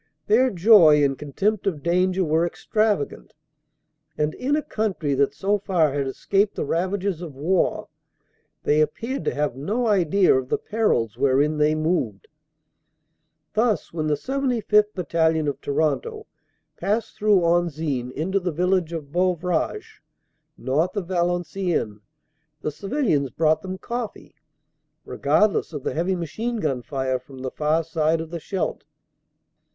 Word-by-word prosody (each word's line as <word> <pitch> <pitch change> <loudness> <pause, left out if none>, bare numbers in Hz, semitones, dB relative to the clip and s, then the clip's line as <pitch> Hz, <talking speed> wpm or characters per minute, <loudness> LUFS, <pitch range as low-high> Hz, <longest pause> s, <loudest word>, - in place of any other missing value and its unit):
Their 250 +5 +4
joy 175 -7 +6
and 135 -1 +2
contempt 195 +10 -2
of 155 -7 -2
danger 185 +2 +2
were 160 0 +2
extravagant, 210 -1 -1 0.8
and, 150 +1 0
in 275 +3 -1
a 305 - -1
country 190 - -2
that 140 +1 +1
so 200 +5 0
far 175 -7 +1
had 140 -1 -1
escaped 200 +9 0
the - - -2
ravages 185 +2 -1
of 160 -6 -8
war, 170 +7 0 0.8
they 150 +1 +3
appeared 230 - -2
to - - 0
have 145 -4 -1
no 210 - -2
idea 195 -3 +3
of 130 -1 -1
the - - +1
perils 125 - 0
wherein 140 +3 +2
they 150 +1 +3
moved. 155 - -1 1.3
Thus, 215 -7 0
when 155 -2 -2
the 150 - +2
75th. 230 - +1
Battalion, 160 -3 +1
of 140 0 -3
Toronto, 425 - -1 0.5
passed 215 +3 -1
through 210 -3 +3
Anzin 160 -7 0
into 185 +8 -1
the 180 -1 -2
village 180 +1 0
of 150 -4 -6
Beuvrages 180 -1 -1 0.6
north 155 - -1
of 185 -3 -3
Valen 175 -1 0
ciennes, 155 - -2 0.6
the 150 - -1
civilians 195 - 0
brought 155 +4 +1
them 185 -1 -5
coffee, 235 +2 -6 0.7
regardless 210 -5 +1
of 145 -3 -5
the - - -2
heavy 175 +4 0
machine 220 +8 -3
gun 140 - -1
fire 130 -2 -2
from 130 +1 -14
the 130 - -3
far 155 +2 +1
side 160 0 0
of 160 0 -6
the 170 - -4
Scheldt. 190 +4 -3
170 Hz, 145 wpm, -23 LUFS, 150-200 Hz, 1.3 s, joy